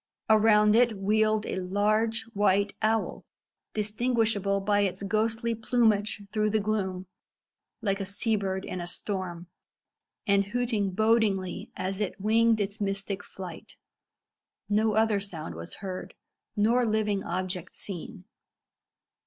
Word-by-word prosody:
Around 210 -1 +5
it 235 -2 +4
wheeled 215 +2 +2
a - - -3
large 215 +4 +1
white 200 0 +2
owl, 220 0 0 0.5
distinguishable 215 -2 +1
by 205 +1 +2
its 195 0 -1
ghostly 225 +3 0
plumage 220 -2 +1
through 215 -1 +1
the 215 +1 +2
gloom, 195 -3 -2 0.8
like 195 -2 0
a 195 - -2
sea 215 +3 0
bird 190 -2 -2
in 180 - -4
a 175 - -5
storm, 180 -2 -4 0.8
and 200 -2 +4
hooting 225 -2 0
bodingly 205 -2 +1
as 190 +2 -3
it 205 0 -2
winged 225 +2 +3
its 205 +1 -3
mystic 195 0 -2
flight. 180 -5 -9 0.9
No 215 +1 +2
other 220 -2 +3
sound 170 - -6
was 85 +1 -7
heard, 185 -1 -6 0.4
nor 230 +4 +3
living 215 -3 +1
object 180 0 -4
seen. 190 0 -7
205 Hz, 125 wpm, -28 LUFS, 195-220 Hz, 0.9 s, Around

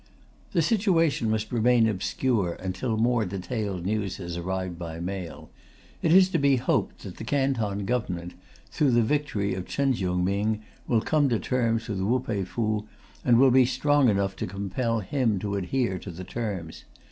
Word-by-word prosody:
The 170 -4 +3
situation 165 - +2
must 110 0 -1
remain 120 0 +4
obscure 105 -1 0
until 100 +5 -3
more 120 0 +2
detailed 100 -1 -4
news 100 -2 -1
has 85 -3 -6
arrived 90 0 -3
by 85 -1 -6
mail. 90 -1 -6 0.5
It 160 - +2
is 185 +1 +7
to 170 - 0
be 140 -1 +4
hoped 130 0 -1
that 95 -3 -8
the - - -7
Canton 115 -7 0
Government, 90 -7 -2 0.4
through 140 -5 +2
the 120 0 +4
victory 110 -6 0
of 95 -1 -5
Chen 140 -1 +1
Chiung 90 -5 -1
Ming, 105 +3 0 0.2
will 115 -3 +2
come 145 +2 +2
to 120 - +2
terms 115 -2 0
with 100 -4 -3
Wu 115 +7 +2
Pei 110 -6 -2
Fu, 105 +1 -2 0.4
and 120 -2 +5
will 135 0 +6
be 130 +1 +6
strong 145 0 +3
enough 100 -1 0
to - - -3
compel 105 +5 -2
him 115 -1 0
to 100 +2 -3
adhere 100 0 -1
to 100 - -8
the 90 +2 -7
terms. 95 -7 -5
110 Hz, 175 wpm, -26 LUFS, 95-130 Hz, 0.5 s, is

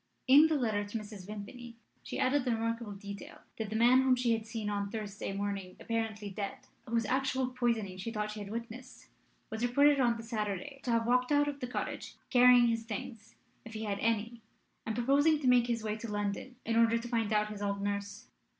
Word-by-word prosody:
In 285 +4 +8
the 320 - +1
letter 220 -7 0
to 205 +2 -4
Mrs. 205 -3 -9
Vimpany 230 +3 -8 0.3
she - - -6
added 260 +1 +2
the 245 -2 +1
remarkable 230 -1 -2
detail 200 0 -9 0.2
that 220 -2 -3
the 220 - -4
man 245 +3 +6
whom 260 -1 +4
she 245 -2 +2
had 225 -1 -3
seen 225 -2 -4
on 205 -1 -1
the 200 - -8
Thursday 210 -3 -4
morning 195 -2 -4
apparently 220 -3 -3
dead, 200 +1 -4 0.3
whose 230 -1 +1
actual 260 +1 0
poisoning 230 -7 -1
she 195 - -4
thought 210 -2 -3
she 210 - -7
had 205 -1 -7
witnessed, 235 +3 -8 0.4
was 220 +1 -3
reported 280 +4 +4
on 240 -3 +3
the 230 - -8
Saturday 225 +5 -4
to 255 - -5
have 230 -1 +2
walked 250 +3 +2
out 290 0 +4
of 285 -1 -4
the 250 - -4
cottage, 245 - -4 0.2
carrying 250 -1 +7
his 230 -1 +1
things, 225 0 -7 0.3
if 225 -1 -10
he 215 - -4
had 200 -2 -2
any, 230 +1 -1 0.5
and 220 - -1
proposing 280 +6 +3
to 285 - -5
make 250 -1 +5
his 230 -2 -1
way 215 -1 -1
to 220 0 -6
London 205 +5 -3
in 230 0 +1
order 230 0 +5
to 230 +1 -5
find 225 -3 0
out 210 0 +2
his 205 -1 -7
old 200 -1 -1
nurse. 200 +2 -3
230 Hz, 215 wpm, -32 LUFS, 210-245 Hz, 0.5 s, In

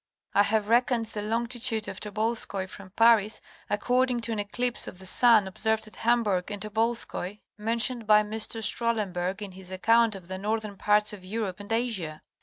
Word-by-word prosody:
I 205 - +5
have 210 0 +1
reckon'd 235 -1 +2
y* 210 - -3
Long' 225 +3 -1
of 235 -2 0
Tobolskoy 215 -2 0
from 190 0 -11
Paris 225 -2 +4 0.3
according 245 +3 +1
to 230 - -1
an 220 - -2
Kclipse 240 +4 -1
of 180 - -9
y* 190 - -7
Sun 220 0 +5
observed 220 +3 -1
at 215 - -12
Ham 235 +1 +2
burg 185 -3 -1
and 205 -1 -5
Tobolskoy, 215 -2 -2 0.2
mentioned 230 +2 0
by 210 0 +6
Mr. 220 +1 -2
Strahlenberg 205 -4 0
in 200 - -7
his 185 0 -10
account 225 +3 +2
of 190 - -10
y® 190 +1 -6
Northern 215 0 -3
parts 210 +1 +2
of 195 -3 -10
Europe 200 -1 -4
and 205 +2 -9
Asia. 215 -10 -1
215 Hz, 180 wpm, -27 LUFS, 200-230 Hz, 0.3 s, by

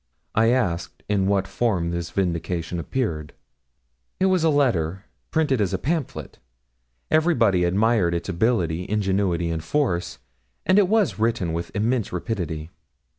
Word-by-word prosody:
I 115 +1 +4
asked 95 -9 -1
in 100 -2 +1
what 100 -1 +1
form 95 -8 0
this 85 -1 -3
vindication 85 -1 -2
appeared. 80 - -3 0.9
'It 190 - +3
was 185 -3 +3
a 165 - +4
letter, 100 - +1 0.2
printed 145 -7 +1
as 95 -1 +1
a - - 0
pamphlet; 150 - -3 0.7
everybody 115 - +3
admired 100 -1 +2
its 85 - -3
ability, 90 -3 0
ingenuity, 95 -4 0
and 80 -1 -3
force, 90 - -1 0.5
and 190 - +5
it 200 - +4
was 210 - +2
written 110 -7 0
with 85 +1 -3
immense 115 +2 0
rapidity.' 85 -4 -4
100 Hz, 135 wpm, -24 LUFS, 85-120 Hz, 0.9 s, and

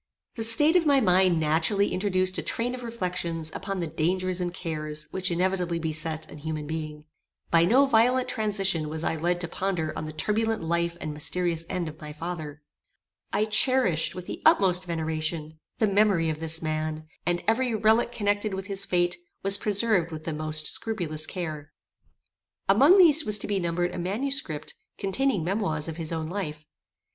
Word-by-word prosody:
The 225 - -2
state 295 +9 +7
of 340 -3 +3
my 280 -2 +5
mind 185 -5 +3
naturally 160 +6 +1
introduced 185 -1 0
a - - -2
train 240 +2 -2
of 255 - -6
reflections 180 -8 -3
upon 195 -1 -4
the - - -1
dangers 180 +4 -1
and 175 -1 -2
cares 155 -3 -4
which 185 -1 -1
inevitably 180 0 0
beset 160 -1 -1
an 150 - -11
human 155 0 -4
being. 155 -1 -6 0.5
By 165 0 +5
no 255 +9 +5
violent 250 0 +3
transition 195 -7 0
was 160 +1 -3
I - - 0
led 175 +2 -1
to 175 - -1
ponder 170 -3 -3
on 155 - -4
the 155 - -6
turbulent 220 +6 -1
life 170 +1 -1
and 155 -2 -5
mysterious 165 +2 -1
end 175 -2 -2
of 155 0 -10
my 150 0 -8
father. 155 -2 -7 0.7
I 210 +2 +1
cherished, 215 - +2
with 180 -1 -7
the - - -7
utmost 185 -2 +3
veneration, 160 -1 -3 0.2
the 220 - +2
memory 200 -5 +2
of 155 - -6
this 165 0 -4
man, 155 0 -3 0.2
and 175 0 0
every 235 +1 +1
relique 220 +2 +2
connected 205 -2 -1
with 190 0 -5
his 195 -1 0
fate 175 -2 0 0.3
was 195 +1 +8
preserved 205 -4 +1
with 155 -1 -7
the 160 - -4
most 155 0 -1
scrupulous 160 -9 -1
care. 155 -5 -6 1.0
Among 320 +8 +6
these 325 -4 +7
was 210 -5 +4
to - - -4
be 200 -1 -1
numbered 175 0 -1
a - - -5
manuscript, 195 - -2 0.2
containing 205 0 0
memoirs 170 -4 -2
of 165 -1 -6
his 165 -1 -3
own 160 -1 -3
life. 155 -5 -5
175 Hz, 175 wpm, -26 LUFS, 160-205 Hz, 1.0 s, was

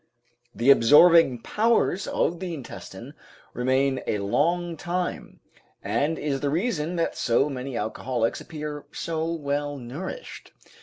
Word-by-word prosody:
The 120 +4 +5
absorbing 145 0 +6
powers 215 -3 +1
of 170 0 0
the 180 -2 -4
intestine 135 -6 -9 0.4
remain 130 +2 +1
a 105 - 0
long 170 - 0
time, 175 +3 -4 0.4
and 155 +3 0
is 140 -2 -2
the 140 - -1
reason 170 - -1
that 165 -1 -1
so 135 +5 +1
many 130 -1 -5
alcoholics 115 +2 -2
appear 150 -2 -7
so 165 0 -3
well 145 -2 -2
nourished. 140 - -8
150 Hz, 120 wpm, -25 LUFS, 130-170 Hz, 0.4 s, absorbing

